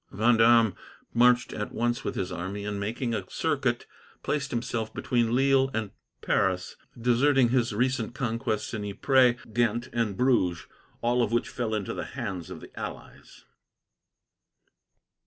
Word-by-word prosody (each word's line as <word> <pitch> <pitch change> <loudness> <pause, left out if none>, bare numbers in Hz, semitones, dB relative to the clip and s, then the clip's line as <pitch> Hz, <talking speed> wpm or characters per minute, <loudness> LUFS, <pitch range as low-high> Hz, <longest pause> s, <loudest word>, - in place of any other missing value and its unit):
Vendome 115 -1 +4 0.4
marched 120 0 +4
at 105 - -4
once 120 +2 -1
with - - -3
his 90 - -3
army, 100 +4 -5
and, 105 -1 -3
making 115 +4 -2
a 100 -4 -4
circuit, - - -1 0.4
placed 140 -2 -1
himself 115 -2 -2
between 120 -1 0
Lille 135 0 +3
and 110 -3 -2 0.3
Paris, 95 -1 0 0.2
deserting 125 +2 +3
his 120 -2 +1
recent 120 +1 -1
conquests 115 -5 -2
in 110 -2 -3
Ypres, 125 +4 +3 0.2
Ghent, 120 +1 +1
and 115 -5 -1
Bruges, 115 -10 +2 0.4
all 120 +1 +2
of 115 - 0
which 120 - 0
fell 115 -3 -2
into 100 -3 -3
the - - -4
hands 100 -9 -4
of - - -8
the - - -12
allies. - - -9
115 Hz, 140 wpm, -27 LUFS, 105-125 Hz, 0.4 s, Vendome